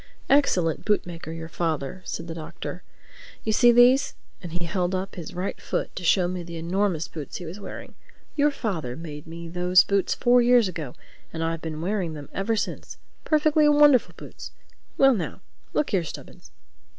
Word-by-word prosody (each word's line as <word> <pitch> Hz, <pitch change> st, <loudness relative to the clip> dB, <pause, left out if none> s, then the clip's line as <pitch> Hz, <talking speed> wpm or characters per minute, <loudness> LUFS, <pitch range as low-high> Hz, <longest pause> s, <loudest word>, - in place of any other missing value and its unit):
"Excellent 185 Hz, -, +3 dB
bootmaker, 175 Hz, -6 st, -1 dB
your 165 Hz, 0 st, -6 dB
father," 160 Hz, 0 st, -3 dB
said -, -, -5 dB
the 165 Hz, -, -6 dB
Doctor. 160 Hz, -1 st, -7 dB, 0.6 s
"You 220 Hz, -, 0 dB
see 240 Hz, +2 st, +6 dB
these?" 245 Hz, +3 st, +5 dB, 0.3 s
and 175 Hz, -3 st, -7 dB
he 175 Hz, +1 st, -3 dB
held 180 Hz, +1 st, -1 dB
up 190 Hz, +1 st, -3 dB
his 170 Hz, -4 st, -8 dB
right 180 Hz, +2 st, -4 dB
foot -, -, -3 dB
to 185 Hz, -, -6 dB
show 175 Hz, +1 st, +3 dB
me 180 Hz, 0 st, -3 dB
the 170 Hz, -1 st, -7 dB
enormous 175 Hz, 0 st, 0 dB
boots 150 Hz, -4 st, -8 dB
he 175 Hz, -, -8 dB
was 170 Hz, +5 st, -7 dB
wearing. 200 Hz, -, -8 dB, 0.4 s
"Your 295 Hz, 0 st, +4 dB
father 180 Hz, -, -3 dB
made 155 Hz, -2 st, -8 dB
me 165 Hz, +1 st, -8 dB
those 180 Hz, +1 st, +4 dB
boots 200 Hz, -1 st, +1 dB
four 245 Hz, 0 st, +4 dB
years 240 Hz, -2 st, +5 dB
ago, 160 Hz, -8 st, -6 dB, 0.4 s
and 165 Hz, 0 st, -3 dB
I've 165 Hz, 0 st, -2 dB
been 155 Hz, -1 st, -5 dB
wearing 185 Hz, -2 st, -1 dB
them 145 Hz, -2 st, -9 dB
ever 195 Hz, +4 st, 0 dB
since—perfectly 305 Hz, +7 st, 0 dB
wonderful 295 Hz, -3 st, +5 dB
boots—Well 270 Hz, -1 st, -1 dB
now, 185 Hz, -8 st, -4 dB, 0.3 s
look 300 Hz, -, 0 dB
here, 190 Hz, -5 st, +2 dB
Stubbins. 155 Hz, -, -10 dB
180 Hz, 170 wpm, -25 LUFS, 165-225 Hz, 0.6 s, see